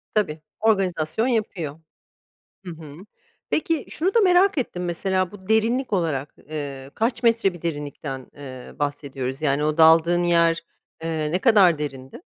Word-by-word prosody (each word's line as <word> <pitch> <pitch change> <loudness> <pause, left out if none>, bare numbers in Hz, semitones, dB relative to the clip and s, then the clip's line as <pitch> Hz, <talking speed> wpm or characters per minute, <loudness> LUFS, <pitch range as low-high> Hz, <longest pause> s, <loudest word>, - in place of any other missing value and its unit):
Tabii, 165 -8 0 0.2
organizasyon 195 -1 +1
yapıyor. 180 - -2 0.9
Hı 180 - -6
hı. 155 -3 -10 0.6
Peki, 315 -2 0
şunu 370 +5 -1
da 465 - +5
merak 375 -2 +4
ettim, 180 -9 -2
mesela. 185 +1 -1
Bu 190 -2 -13
derinlik 230 +3 +1
olarak, 155 -7 -1 0.2
eee, 140 -3 -6
kaç 240 +2 -1
metre 230 -5 +3
bir 175 - -11
derinlikten, 145 -4 -5
eee, 130 -3 -10
bahsediyoruz? 140 -2 -3
Yani, 145 -1 +1
o 155 +1 0
daldığın 165 +2 +5
yer, 170 -1 +3 0.4
eee, 160 -2 -2
ne 180 - +1
kadar 195 - +5
derindi? 135 - -6
170 Hz, 140 wpm, -23 LUFS, 150-215 Hz, 0.9 s, da